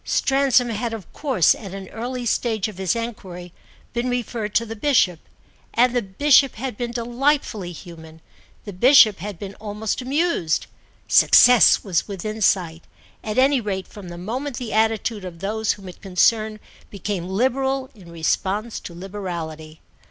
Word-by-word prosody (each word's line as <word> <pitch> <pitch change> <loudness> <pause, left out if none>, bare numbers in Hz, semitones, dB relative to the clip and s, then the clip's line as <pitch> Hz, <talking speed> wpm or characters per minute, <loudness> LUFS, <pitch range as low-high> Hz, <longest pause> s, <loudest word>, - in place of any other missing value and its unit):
Stransom 270 -2 +2
had 225 +1 -3
of 210 - -12
course 260 - +3
at 195 -3 -9
an 195 -1 -8
early 245 +2 -5
stage 225 -3 0
of 205 -3 -10
his 190 +1 0
enquiry 185 -7 -6 0.4
been 240 +1 -1
referred 235 -3 -3
to 230 - +3
the 225 0 -7
Bishop, 210 - +2 0.6
and 245 +1 +3
the 245 - +2
Bishop 270 +7 +3
had 255 0 -5
been 240 +2 -4
delightfully 240 -4 -1
human, 160 -2 -12 0.5
the 205 - -7
Bishop 225 0 +6
had 200 +1 -6
been 195 +2 -7
almost 215 +2 -3
amused. 270 - 0 0.4
Success 250 -2 +6
was 185 -6 -1
within 215 +2 -5
sight, 175 -4 +1 0.4
at 215 +1 -4
any 265 0 +4
rate 190 -3 -4
from 200 -4 -11
the 175 - -8
moment 245 +9 -4
the 245 -4 -5
attitude 220 -1 0
of 180 -2 -8
those 215 +4 -1
whom 195 -2 -12
it 180 - -11
concerned 215 +3 +1 0.3
became 195 -2 -4
liberal 265 +5 0
in 180 -6 -15
response 195 +7 -2
to 170 - -10
liberality. 170 -5 -7
215 Hz, 155 wpm, -22 LUFS, 185-245 Hz, 0.6 s, Bishop